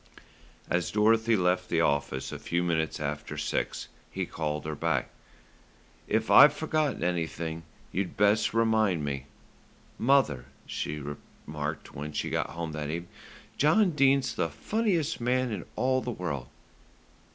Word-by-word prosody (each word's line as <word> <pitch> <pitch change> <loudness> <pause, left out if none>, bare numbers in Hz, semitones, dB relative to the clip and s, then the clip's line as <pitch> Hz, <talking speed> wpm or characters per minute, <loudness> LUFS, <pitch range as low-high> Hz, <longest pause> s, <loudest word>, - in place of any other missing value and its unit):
As 85 0 0
Dorothy 110 +2 +3
left 90 -1 +1
the 85 - +2
office 70 -3 0
a - - -6
few 85 +1 -1
minutes 80 -2 0
after 75 0 -4
six - - -2 0.2
he - - -3
called 75 -2 -3
her 80 - -3
back. 75 -3 0 1.0
"If 110 +1 0
I've 150 0 +9
forgotten 155 - 0
anything 85 -2 -2 0.3
you'd 95 -1 -3
best 105 +2 +3
remind 110 -8 +2
me." 70 -2 -3 0.7
"Mother," 115 - +3 0.2
she 75 +1 -4 0.5
remarked, 75 0 -5
when 75 +2 -6
she - - -2
got - - 0
home 85 -1 -5
that 75 -1 -4
evening, 85 +2 -4 0.5
"John 180 +6 +4
Dene's 140 -3 +3
the 80 - -1
funniest 165 - -1
man 125 +1 +1
in 100 -4 -4
all 130 0 +2
the 125 - -4
world." 75 - -4
90 Hz, 140 wpm, -28 LUFS, 75-125 Hz, 1.0 s, I've